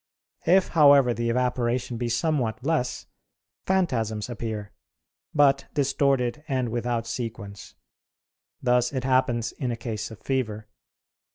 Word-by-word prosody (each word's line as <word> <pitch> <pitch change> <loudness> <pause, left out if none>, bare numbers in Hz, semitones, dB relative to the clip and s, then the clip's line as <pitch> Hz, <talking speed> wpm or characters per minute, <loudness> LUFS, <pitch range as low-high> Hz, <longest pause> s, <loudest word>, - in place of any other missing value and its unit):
If, 185 +2 +4
however, 140 -6 +6
the 115 0 -2
evaporation 125 0 0
be 120 0 -2
somewhat 120 -3 0
less, 130 -6 -1 0.6
phantasms 120 - 0
appear, 110 -3 -5 0.6
but 140 -2 +3
distorted 140 -1 +1
and 130 -3 -1
without 120 0 -2
sequence; 110 -5 -6 0.9
thus 125 -1 +2
it 130 -3 -3
happens 130 -3 +1
in 130 -4 -4
a 115 - -3
case 110 -3 -4
of 110 - -11
fever. 110 -6 -2
125 Hz, 115 wpm, -25 LUFS, 115-135 Hz, 0.9 s, however